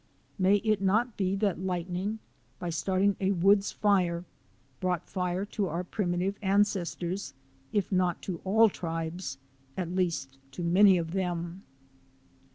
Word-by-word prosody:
May 190 +2 +5
it 215 -3 +2
not 220 +5 +2
be 190 -1 0
that 200 -3 0
light 180 -2 -2
ning, 190 +4 -2 0.4
by 175 - -4
starting 190 +4 +1
a 195 0 +2
woods 195 +3 +4
fire, 180 -4 +1 0.5
brought 180 -2 -1
Fire 180 +1 -2
to 205 -1 -2
our 170 +2 -2
primitive 185 0 -1
ancestors, 190 -3 0 0.4
if 205 -2 0
not 180 -2 +1
to 175 -4 -4
all 220 +4 +5
tribes, 165 -4 -4 0.4
at 175 -2 -2
least 165 -8 -1
to 175 - -5
many 185 +3 +6
of 165 -1 -3
them 175 -1 -2
185 Hz, 140 wpm, -29 LUFS, 175-200 Hz, 0.5 s, many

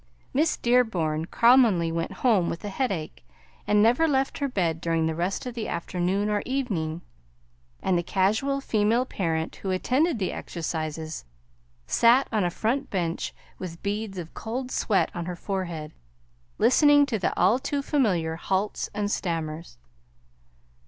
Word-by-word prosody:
Miss 305 +4 +2
Dearborn 185 -11 +1
commonly 230 -7 +4
went 165 0 -2
home 205 -8 +4
with 170 - -5
a - - -3
headache, 190 -8 -3 0.4
and 210 0 +4
never 245 +9 +4
left 270 -2 0
her 285 - 0
bed 170 - -1
during 165 -1 +1
the 160 - 0
rest 175 +8 -2
of 250 - -4
the 230 -2 -4
afternoon 180 +4 -1
or 210 -1 0
evening; 180 -12 -2 0.8
and 190 - +2
the 175 - +2
casual 215 +10 +1
female 225 +1 +2
parent 165 -8 -2
who 195 - -5
attended 260 - +1
the 190 -3 -1
exercises 160 -1 -4 0.6
sat 240 - +4
on 215 -3 +1
a 175 - +1
front 250 +10 -1
bench 170 -4 -2 0.3
with 170 -3 -7
beads 205 -1 -3
of 170 -2 -7
cold 250 +3 -5
sweat 205 -4 +1
on 175 -1 -4
her 180 - -3
forehead, 175 -5 -4 0.7
listening 290 +2 +5
to 230 -6 -2
the 180 - -1
all 205 +8 +4
too 280 +1 -2
familiar 180 - +1
halts 195 +4 -1
and 205 0 -1
stammers. 165 -3 -3
195 Hz, 150 wpm, -26 LUFS, 170-245 Hz, 0.8 s, listening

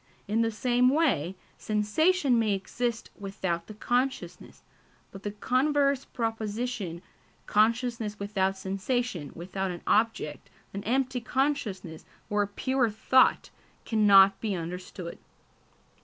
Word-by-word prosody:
In 215 +3 +1
the 225 - +2
same 245 +3 +2
way, 255 - +1 0.2
sensation 245 - +2
may 215 -3 +2
exist 230 +4 -3
without 190 -4 -3
the 215 - -9
consciousness; 250 +5 -2 0.5
but 195 - -10
the 205 - -3
converse 275 +5 +1
proposition, 225 -5 -3 0.4
consciousness 225 0 +1
without 195 -1 -1
sensation, 195 - -2
without 190 +3 -3
an 175 -1 -6
object, 215 -9 0 0.2
an 200 +1 -5
empty 255 +1 0
consciousness 230 - -2 0.3
or 205 0 +2
a 205 - 0
"pure 255 +4 0
thought," 220 +5 +3 0.3
cannot 200 -3 +6
be 210 -4 -1
understood. 180 0 -6
215 Hz, 110 wpm, -28 LUFS, 195-245 Hz, 0.5 s, cannot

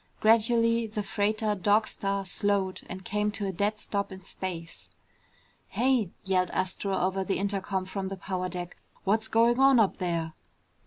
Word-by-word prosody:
Gradually 230 +1 +3
the 210 -1 -3
freighter 210 +2 0
Dog 205 +3 +2
Star 195 0 -2
slowed 195 0 0
and 185 +1 -7
came 210 +1 0
to 205 - -3
a 195 - -1
dead 205 +4 0
stop 200 -1 -2
in 190 0 -9
space. 170 -3 -5 0.8
"Hey!" 245 -6 +1 0.2
yelled 185 -2 +2
Astro 190 +1 -1
over 190 +1 0
the 195 - -1
intercom 195 -1 -1
from 190 0 -4
the 195 0 -5
power 185 0 -3
deck. 175 0 -6 0.3
"What's 220 +3 +1
going 230 +2 +3
on 270 -2 +6
up 210 -4 +3
there?" 170 -3 -2
200 Hz, 160 wpm, -28 LUFS, 185-215 Hz, 0.8 s, on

